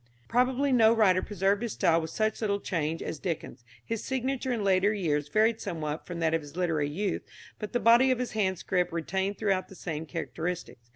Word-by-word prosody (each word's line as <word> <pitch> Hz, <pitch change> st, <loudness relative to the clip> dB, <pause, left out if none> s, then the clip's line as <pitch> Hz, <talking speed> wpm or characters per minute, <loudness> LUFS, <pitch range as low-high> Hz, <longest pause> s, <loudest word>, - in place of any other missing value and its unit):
Probably 255 Hz, +3 st, +2 dB
no 225 Hz, -3 st, +6 dB
writer 190 Hz, -5 st, +4 dB
preserved 200 Hz, +1 st, 0 dB
his 235 Hz, -3 st, -2 dB
style 170 Hz, -3 st, +3 dB
with 160 Hz, -, -5 dB
such 215 Hz, +6 st, -1 dB
little 200 Hz, -2 st, 0 dB
change 165 Hz, -4 st, -2 dB
as 155 Hz, -, -5 dB
Dickens. 155 Hz, -8 st, -4 dB, 0.2 s
His 225 Hz, -1 st, -3 dB
signature 265 Hz, 0 st, -2 dB
in 230 Hz, -4 st, -1 dB
later 195 Hz, +1 st, +3 dB
years 150 Hz, -8 st, 0 dB
varied 220 Hz, +6 st, +2 dB
somewhat 160 Hz, -5 st, -4 dB
from 175 Hz, -1 st, -5 dB
that 160 Hz, -1 st, +2 dB
of 165 Hz, -, +1 dB
his 145 Hz, +1 st, -12 dB
literary 160 Hz, -5 st, 0 dB
youth, 190 Hz, +5 st, -2 dB, 0.4 s
but 210 Hz, -, -5 dB
the 245 Hz, -, +1 dB
body 240 Hz, +3 st, +6 dB
of 255 Hz, -, +3 dB
his 250 Hz, 0 st, -3 dB
handscript 190 Hz, -3 st, 0 dB
retained 190 Hz, +4 st, -2 dB
throughout 195 Hz, -3 st, 0 dB
the 190 Hz, -, -13 dB
same 160 Hz, -2 st, -5 dB
characteristics. 165 Hz, -7 st, -5 dB
190 Hz, 195 wpm, -28 LUFS, 165-220 Hz, 0.4 s, no